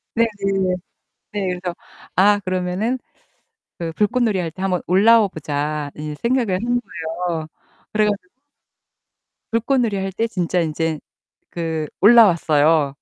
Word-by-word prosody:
네네. 195 Hz, -5 st, +1 dB, 0.6 s
네. 205 Hz, -2 st, -2 dB
그래서 180 Hz, -1 st, -4 dB, 0.4 s
아 205 Hz, +2 st, +5 dB
그러면은 185 Hz, +7 st, -1 dB, 0.8 s
그 165 Hz, -1 st, -4 dB
'불꽃놀이 215 Hz, +1 st, +1 dB
할 170 Hz, -2 st, -2 dB
때 190 Hz, -, -8 dB
한번 185 Hz, -2 st, 0 dB
올라와 210 Hz, +3 st, +5 dB
보자.' 150 Hz, -2 st, -3 dB
이제 150 Hz, 0 st, -5 dB
생각을 235 Hz, -5 st, +1 dB
한 245 Hz, +1 st, +1 dB
거예요. 165 Hz, -4 st, -4 dB, 0.5 s
그래 215 Hz, 0 st, +3 dB
가지고 200 Hz, -3 st, -2 dB, 1.2 s
불꽃놀이 230 Hz, -2 st, +1 dB
할 195 Hz, 0 st, -2 dB
때 225 Hz, +5 st, -1 dB
진짜 180 Hz, -4 st, -1 dB
인제 160 Hz, -1 st, -1 dB, 0.5 s
그 160 Hz, -2 st, -3 dB
올라왔어요 165 Hz, -9 st, +5 dB
185 Hz, 255 characters per minute, -21 LUFS, 165-215 Hz, 1.2 s, 아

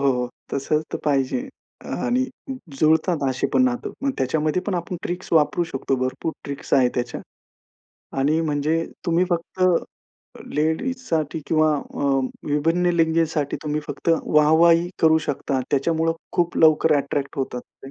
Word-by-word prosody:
हो. 125 Hz, -1 st, -2 dB, 0.2 s
तसं 145 Hz, +2 st, 0 dB
तर -, -, -2 dB
पाहिजे 140 Hz, -, +1 dB, 0.6 s
आणि 250 Hz, +1 st, +2 dB, 0.5 s
जुळतात 160 Hz, +1 st, +3 dB
असे 130 Hz, -1 st, 0 dB
पण -, -, +4 dB
नातं 250 Hz, -1 st, -1 dB
मग 275 Hz, -, +1 dB
त्याच्यामध्ये 155 Hz, +6 st, 0 dB
पण 200 Hz, -, -1 dB
आपण 175 Hz, +1 st, -3 dB
ट्रिक्स 180 Hz, +1 st, -4 dB
वापरू 165 Hz, +2 st, +3 dB
शकतो. 135 Hz, -3 st, -2 dB
भरपूर 130 Hz, +5 st, -2 dB
ट्रिक्स 140 Hz, 0 st, -7 dB
आहेत 125 Hz, -2 st, +4 dB
त्याच्या 120 Hz, -1 st, -3 dB, 1.0 s
आणि 150 Hz, +4 st, +2 dB
म्हणजे 155 Hz, +1 st, 0 dB, 0.2 s
तुम्ही 170 Hz, +2 st, +3 dB
फक्त 175 Hz, +2 st, -2 dB, 0.9 s
लेडीजसाठी 160 Hz, -, -1 dB
किंवा 155 Hz, -1 st, +3 dB
अ, 140 Hz, -, -8 dB, 0.5 s
विभिन्न 165 Hz, +5 st, +1 dB
लिंगसाठी 160 Hz, -3 st, +1 dB
तुम्ही 150 Hz, 0 st, -1 dB
फक्त 165 Hz, -, -2 dB
वाहवाही 165 Hz, +3 st, +4 dB
करू 160 Hz, 0 st, +6 dB
शकता. 135 Hz, -1 st, -1 dB
त्याच्यामुळे 160 Hz, +3 st, +1 dB, 0.2 s
खूप 175 Hz, -1 st, 0 dB
लवकर 155 Hz, -1 st, +5 dB
अट्रॅक्ट 140 Hz, 0 st, -2 dB
होतात 130 Hz, -2 st, -2 dB, 0.2 s
ते. 135 Hz, -, -9 dB
155 Hz, 135 wpm, -23 LUFS, 140-170 Hz, 1.0 s, करू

